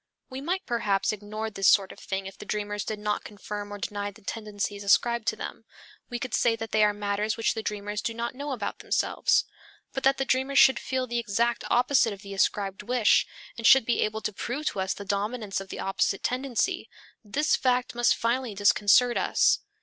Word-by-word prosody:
We 260 +1 -5
might 365 +6 -2
perhaps 210 -5 0
ignore 215 +1 -5
this 195 -2 +1
sort 195 -2 +5
of - - -13
thing 190 0 -4
if 195 - -8
the - - -10
dreamers 205 0 -3
did 215 - -4
not 210 0 -2
confirm 205 0 -7
or 205 - -5
deny 205 0 -3
the 205 +1 -16
tendencies 205 -1 -4
ascribed 235 +3 +2
to 220 - +1
them; 220 - -7 0.5
we 240 - -3
could 245 -1 -6
say 235 -2 +3
that 225 0 -6
they 215 0 +4
are 210 - +5
matters 205 +1 -2
which 225 - +1
the 225 - -4
dreamers 210 0 -4
do 230 - -3
not 235 +1 -3
know 285 +2 -5
about 230 -6 -4
themselves. - - +1 0.5
But 270 - -2
that 270 +1 +3
the 270 - -1
dreamers 265 +1 0
should 265 - +7
feel 260 -1 -2
the 240 -1 -2
exact 235 +2 0
opposite 245 -2 +3
of 200 - -12
the 200 0 -8
ascribed 195 0 0
wish, 245 -3 +3 0.3
and 230 - +2
should 265 -3 +7
be 240 - +1
able 215 +1 -1
to 215 - -3
prove 275 +9 -4
to - - -6
us 190 0 -1
the 200 - -8
dominance 205 0 -2
of 195 - -10
the - - -7
opposite 195 0 0
tendency 270 - -1 0.3
this 280 +9 +1
fact 250 -1 +1
must 240 0 +3
finally 235 -1 -1
disconcert 205 +4 +4
us. - - +3
220 Hz, 210 wpm, -27 LUFS, 205-245 Hz, 0.5 s, should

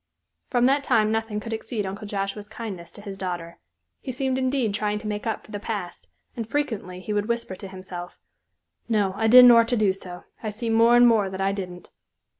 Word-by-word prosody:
From 245 -2 +2
that 275 +2 +3
time 215 -5 +3
nothing 220 -1 -1
could 225 +2 -6
exceed 220 -1 -3
Uncle 200 +2 -6
Joshua's 200 +1 -3
kindness 200 -7 -7
to - - -11
his 200 -2 -7
daughter. 175 -3 -5 0.4
He 260 - -5
seemed 260 +1 -1
indeed 260 -5 0
trying 210 0 -1
to 210 0 -6
make 210 +1 -3
up 225 - -3
for - - -15
the 205 - -4
past, 200 -5 -5 0.3
and 230 -2 -5
frequently 220 -10 -2
he 210 - -4
would 205 0 0
whisper 235 -5 -2
to 195 - -8
himself, 185 -2 -8 0.7
"No, 205 -4 +1
I 220 +2 +1
didn't 250 +1 +10
or'to 235 +1 +5
do 205 -3 +3
so. 180 -2 -9 0.2
I 220 - -3
see 225 +2 -3
more 230 +1 +5
and 240 0 +7
more 215 -4 +3
that 190 0 -7
I 195 0 +2
didn't." 180 -3 -7
210 Hz, 210 wpm, -25 LUFS, 195-230 Hz, 0.7 s, didn't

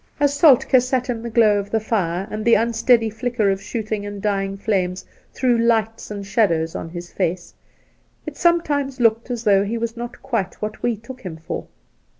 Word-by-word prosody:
As 285 -1 +3
Soltk^ 270 -4 +5
sat 255 0 -1
in 230 -2 -4
the 235 - -5
glow 215 -3 +4
of 200 0 -6
the 225 - +1
fire, 195 -4 -1
and 215 0 -4
the 235 - +5
unsteady 230 +1 +3
flicker 225 -2 0
of 195 0 -2
shooting 215 -1 -4
and 205 0 -6
dying 195 -1 -1
flanles 185 -3 -1 0.3
threw 250 -2 +1
lights 225 -1 +1
and 200 -1 -6
shadows 170 -6 +1
on 165 - -5
his 175 +1 -8
face, 175 -1 -2 0.7
it - - -6
sometimes 290 -6 +1
looked 230 0 +2
as 240 -2 -3
though 200 -2 +4
he 220 +3 -2
was 230 0 -3
not 240 +1 -8
quite 230 -8 -2
what 215 0 -5
we 240 -1 0
took 255 +4 -11
him 175 -4 -7
for. 160 - -6
220 Hz, 190 wpm, -21 LUFS, 195-240 Hz, 0.7 s, Soltk^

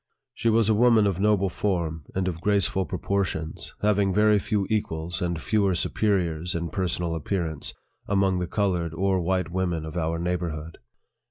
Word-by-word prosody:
She 115 - 0
was 115 -1 +3
a 110 - +4
woman 115 -1 +5
of 95 -3 0
noble 100 -1 +3
form, 85 -6 -2
and 95 0 0
of 85 -2 -3
graceful 100 -2 +1
proportions, 90 -4 -3
having 100 -2 +3
very 105 +1 +4
few 100 -1 0
equals, 85 -6 -2
and 85 -2 -1
fewer 100 +1 +1
superiors, 90 -3 0
in 85 0 -2
personal 90 -3 -1
appearance, 80 -1 -3 0.3
among 95 -2 +2
the 90 - -2
colored 90 -5 -1
or 95 +1 +1
white 90 -1 0
women 90 -3 -1
of 80 +1 -7
our 85 -1 -1
neighborhood. 85 -2 -3
90 Hz, 160 wpm, -26 LUFS, 85-100 Hz, 0.3 s, woman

